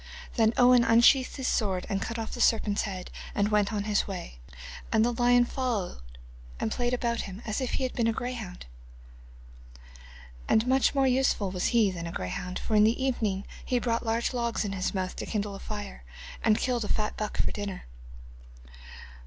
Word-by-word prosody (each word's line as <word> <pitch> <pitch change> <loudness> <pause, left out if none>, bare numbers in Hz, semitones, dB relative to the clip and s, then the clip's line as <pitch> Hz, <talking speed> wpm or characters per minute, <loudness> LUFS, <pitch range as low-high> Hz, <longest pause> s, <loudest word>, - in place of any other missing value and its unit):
Then 225 -2 +3
Owen 245 -1 +6
unsheathed 240 +3 +5
his 265 -2 -3
sword, 190 -5 0
and 195 -1 -2
cut 230 +3 -4
off 225 -1 -4
the 240 - -4
serpent's 215 -3 +3
head 185 -3 -5 0.2
and 205 0 +2
went 210 -1 +2
on 205 -2 -1
his 210 -1 0
way, 120 - -7 0.5
and 220 0 +4
the 240 - +1
lion 245 +1 +4
followed 235 - -2 0.6
and 110 - -1
played 240 0 0
about 235 -1 -1
him, 195 +3 -8
as 215 +3 -2
if 255 - -2
he - - -1
had 255 - -2
been 235 -2 +1
a - - +3
greyhound. 230 -6 -5 1.8
And 220 +1 +4
much 265 +2 +3
more 270 -1 +3
useful 255 -6 +2
was 180 -1 -2
he 225 -5 +3
than 170 -2 -5
a - - -5
greyhound, 180 - -4
for 220 - -2
in 210 - +6
the 225 +4 +3
evening 220 -7 -1 0.2
he 250 - 0
brought 235 -1 0
large 230 +2 0
logs 235 -3 -1
in 200 - -3
his 190 0 -2
mouth 185 -1 -2
to - - -5
kindle 205 -2 -2
a 195 - -8
fire, 205 - -7 0.4
and 215 -1 +4
killed 245 -3 0
a - - -4
fat 210 0 -1
buck 215 -1 -4
for - - +1
dinner. 205 -2 -5
220 Hz, 195 wpm, -28 LUFS, 200-240 Hz, 1.8 s, Owen